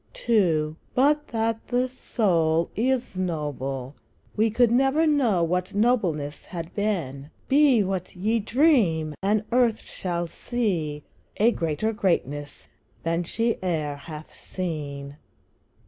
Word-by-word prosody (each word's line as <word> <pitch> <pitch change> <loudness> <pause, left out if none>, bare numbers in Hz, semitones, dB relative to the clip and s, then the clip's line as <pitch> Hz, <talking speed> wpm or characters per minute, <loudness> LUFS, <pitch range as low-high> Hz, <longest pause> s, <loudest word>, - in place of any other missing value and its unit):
II. 165 -9 +2 0.2
But 295 +3 +3
that 225 -1 -2
the 250 +1 +1
soul 170 -10 +1
is 250 -1 0
noble, 145 -7 -3 0.4
we 220 +1 +3
Could 230 +1 +3
never 270 +6 +3
know 250 - +3
what 180 +3 -1
nobleness 185 -11 +1
had 170 -2 -7
been; 160 -10 -2 0.2
Be 270 -5 +5
what 190 -1 -3
ye 215 +6 +1
dream! 215 - +2
and 210 +2 +2
earth 240 -2 +3
shall 175 -2 -3
see 165 -7 -2 0.3
A 225 +3 +4
greater 170 +5 -1
greatness 145 - -2 0.4
than 165 +1 0
she 225 +7 -1
e'er 155 -6 -1
hath 155 +2 -9
seen. 145 -5 -5
185 Hz, 115 wpm, -25 LUFS, 160-230 Hz, 0.4 s, Be